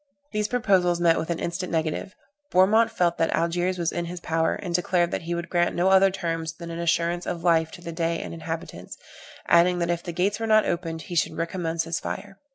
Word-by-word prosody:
These 210 -1 0
proposals 190 -8 +2
met 170 -1 +4
with 160 - -4
an 170 - -1
instant 180 +2 -3
negative: 160 +4 -2 0.4
Bourmont 215 +5 +5
felt 175 -6 0
that 165 - +2
Algiers 175 +2 0
was 170 -1 0
in 175 - -3
his 175 +1 -6
power, 165 -1 0
and 180 -3 -5
declared 175 0 +1
that - - -2
he 170 +1 -3
would 170 0 -4
grant 175 -1 +1
no 180 +2 +2
other 190 0 +6
terms 165 -3 -3
than 170 0 -8
an 165 - -5
assurance 170 +1 0
of 170 -2 -3
life 165 -2 +3
to 175 - -12
the 170 - -6
Dey 165 0 -1
and - - -6
inhabitants, 165 0 -6 0.5
adding 180 +1 +4
that 170 0 0
if 170 0 -1
the 175 - -6
gates 195 +5 0
were 225 - -2
not 215 -1 +5
opened 165 -2 -3
he 175 - -8
should 165 - 0
recommence 165 -1 -2
his 165 0 -3
fire. 195 -1 -6
170 Hz, 225 wpm, -25 LUFS, 165-180 Hz, 0.5 s, other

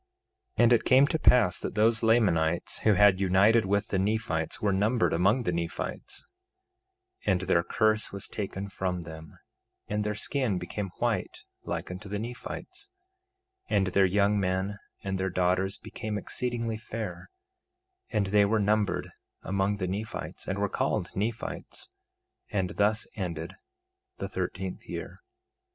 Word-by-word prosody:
2:14 - - +5
And 120 +1 +6
it 120 - +4
came 130 +2 +6
to 160 - 0
pass 105 - +5
that - - -5
those 110 +1 +3
Lamanites 90 -8 +2
who 105 -2 +4
had 100 -1 +6
united 100 +3 +4
with 100 +1 +1
the 95 - +1
Nephites 100 -6 -1
were 100 -2 +1
numbered 110 +3 +2
among 100 +9 +3
the 90 - 0
Nephites; 85 -1 -4 1.0
2:15 - - +5
And 90 -1 +1
their 95 -2 +3
curse 110 +5 +1
was 100 -1 -5
taken 100 -1 -4
from 90 -2 -2
them, 80 -1 -10 0.5
and 105 0 -1
their 105 0 -1
skin 120 -2 0
became 95 +3 -4
white - - -1 0.2
like - - -3
unto 95 +3 -8
the 105 - -2
Nephites; 125 - -7 0.8
2:16 - - +1
And 95 - +2
their 95 +1 +4
young 100 +2 +3
men 95 +2 -1 0.2
and 95 -1 -2
their 95 0 0
daughters 90 +2 +1
became 110 -1 -5
exceedingly 115 +1 -2
fair, 110 -6 -6 0.8
and 105 -3 +1
they 100 +1 +4
were 110 +2 +2
numbered 105 0 +1 0.3
among 100 +2 0
the 95 -2 -2
Nephites, 105 +4 -5
and - - -1
were - - +1
called - - -1
Nephites. 110 +4 -4 0.6
And 95 -3 -1
thus 105 +2 +2
ended 85 -5 -4 0.6
the - - -3
thirteenth - - -4
year. - - -6
100 Hz, 150 wpm, -28 LUFS, 95-110 Hz, 1.0 s, And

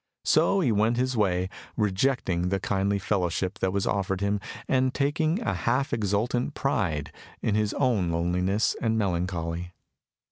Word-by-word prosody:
So 195 - +4
he 130 -9 +2
went 110 +3 +2
his 130 +1 0
way, 95 -4 +1 0.3
rejecting 95 -4 +1
the 95 +1 0
kindly 100 +1 0
fellowship 95 +1 -1
that 95 - +1
was 100 0 0
offered 95 -1 0
him, 100 +1 0 0.3
and 130 0 +2
taking 155 +5 +1
a - - -1
half 130 +4 0
exultant 115 +6 0
pride 85 - -1 0.3
in 110 - +1
his 105 0 0
own 115 -10 +1
loneliness 90 +5 +1
and 110 -1 +1
melancholy. 90 -3 -2
100 Hz, 145 wpm, -27 LUFS, 90-120 Hz, 0.3 s, So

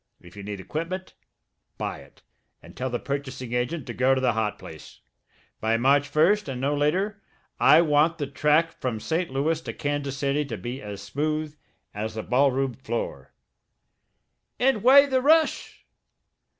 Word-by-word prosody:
If 90 +2 -16
you 100 - -8
need 100 0 -6
equipment, 170 - -5 0.6
buy - - -4
it - - -18 0.4
and - - -15
tell 130 +1 -3
the 120 - -2
purchasing 130 -3 -5
agent 125 +5 -2
to - - -6
go 130 +1 +3
to - - 0
the 125 -2 +2
hot 110 -1 -1
place. 80 -1 -12 0.6
By 110 +1 +1
March 140 +4 +2
1st, 185 +7 +3
and 130 -2 -4
no 140 +3 0
later, 190 +8 0 0.4
I 160 - +7
want 155 +1 +3
the 145 - -2
track 150 +4 +2
from 120 -4 -2
St. 165 +8 -2
Louis 155 +4 0
to - - -6
Kansas 145 -2 -3
City 140 +1 0
to - - -5
be 125 +3 -6
as 100 -1 -7
smooth 150 +7 -2 0.4
as 110 +1 -5
a 110 - -3
ballroom 135 0 +1
floor." 120 -2 -5 1.3
"And 250 -4 +2
why 275 +4 +8
the 260 -2 +1
rush?" 315 +3 +2
140 Hz, 165 wpm, -25 LUFS, 125-165 Hz, 1.3 s, why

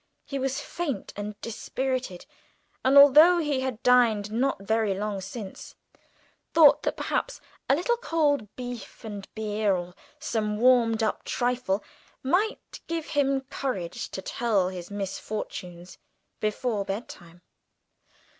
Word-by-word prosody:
He 275 - -4
was 270 +1 -1
faint 290 - -4
and 205 0 -6
dispirited, 255 -3 -3 0.6
and 265 +2 +5
although 300 +5 +9
he 295 -5 0
had 260 -4 -3
dined 230 -5 +4
not 240 -2 0
very 220 -1 +1
long 205 -1 -3
since, 195 +1 -8 0.8
thought 310 -3 +7
that - - -2
perhaps - - -2 0.3
a 275 - +6
little 475 +10 0
cold 295 - +1
beef 245 -2 -8
and 205 -3 -7
beer, 210 -2 0
or 175 0 -5 0.2
some 210 -2 -2
warmed 230 -2 +4
up 220 - -1
trifle, 245 -5 -1 0.4
might 365 +11 -1
give 330 -2 -3
him 275 -2 +1
courage 250 -10 -4
to 190 - -6
tell 205 -6 +1
his 180 -2 -7
misfortunes 190 -3 -6 0.4
before 215 0 -1
bedtime. 180 -4 -7
230 Hz, 125 wpm, -27 LUFS, 205-270 Hz, 0.8 s, although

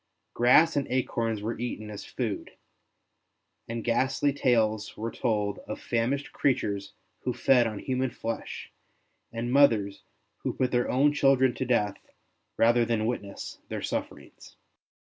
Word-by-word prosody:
Grass 155 +7 +5
and 140 -2 0
acorns 115 -4 -1
were 115 +1 -3
eaten 110 -3 -4
as 105 - -7
food, - - -4 1.1
and 115 0 -4
ghastly 130 +4 +1
tales 110 -6 +1
were 115 +2 -3
told 105 -4 -1
of 110 - -5
famished 125 +4 -1
creatures 100 -7 0 0.3
who 125 - -3
fed 125 -1 +4
on 110 -2 -5
human 130 +3 -1
flesh, 115 -1 -6 0.6
and 120 +2 -3
mothers 110 -8 +4 0.4
who - - -2
put 130 -1 0
their 120 0 +1
own 145 +3 +3
children 135 -3 +4
to 130 - -3
death 105 -5 +1 0.6
rather 120 +1 +4
than 115 -2 0
witness 105 -4 -5
their - - -4
sufferings. - - -6
120 Hz, 135 wpm, -28 LUFS, 110-130 Hz, 1.1 s, Grass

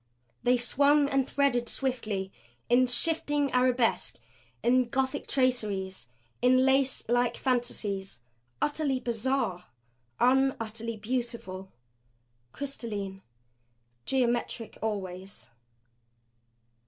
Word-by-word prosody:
They 250 +1 +3
swung 285 +4 +4
and 270 -1 +1
threaded 245 -4 +1
swiftly, 215 -8 -2 0.4
in 250 +1 +5
shifting 290 +2 +1
arabesque, 250 -2 +2 0.5
in 245 0 +3
Gothic 265 +2 -1
traceries, 210 - 0 0.3
in 255 +1 +5
lace 265 0 +2
like 245 0 +2
fantasies; 205 - -2 0.4
utterly 290 -3 +1
bizarre, 235 -6 -1 0.5
unutterably 230 -3 +1
beautiful 215 -5 -4 0.8
crystalline, 210 -8 -5 0.9
geometric 240 -3 -1
always. 190 -5 -5
245 Hz, 80 wpm, -29 LUFS, 215-265 Hz, 0.9 s, in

